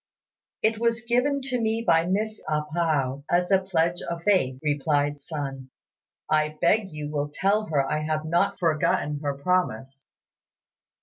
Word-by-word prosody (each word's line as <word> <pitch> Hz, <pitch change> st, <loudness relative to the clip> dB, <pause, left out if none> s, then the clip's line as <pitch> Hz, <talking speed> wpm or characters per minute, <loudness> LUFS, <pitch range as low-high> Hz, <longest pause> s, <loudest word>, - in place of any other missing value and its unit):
"It 220 Hz, 0 st, +2 dB
was 230 Hz, 0 st, +1 dB
given 250 Hz, +4 st, +1 dB
to 255 Hz, -2 st, -2 dB
me 225 Hz, +1 st, 0 dB
by 165 Hz, -3 st, +3 dB
Miss 215 Hz, +3 st, -1 dB
A 150 Hz, 0 st, +1 dB
pao 145 Hz, -5 st, 0 dB
as 180 Hz, +2 st, +1 dB
a 195 Hz, -, +6 dB
pledge 175 Hz, -2 st, 0 dB
of 170 Hz, -1 st, -5 dB
faith," 130 Hz, -11 st, +2 dB
replied 145 Hz, -1 st, 0 dB
Sun; 135 Hz, -3 st, -6 dB, 0.6 s
"I 155 Hz, 0 st, +1 dB
beg 210 Hz, -2 st, +2 dB
you 150 Hz, -1 st, -5 dB
will 145 Hz, -1 st, -2 dB
tell 205 Hz, +6 st, +1 dB
her 140 Hz, -3 st, +1 dB
I 155 Hz, -, 0 dB
have 155 Hz, 0 st, -2 dB
not 170 Hz, +2 st, +1 dB
forgotten 155 Hz, -3 st, +1 dB
her 145 Hz, -1 st, -2 dB
promise." 135 Hz, -5 st, -1 dB
160 Hz, 150 wpm, -25 LUFS, 145-200 Hz, 0.6 s, a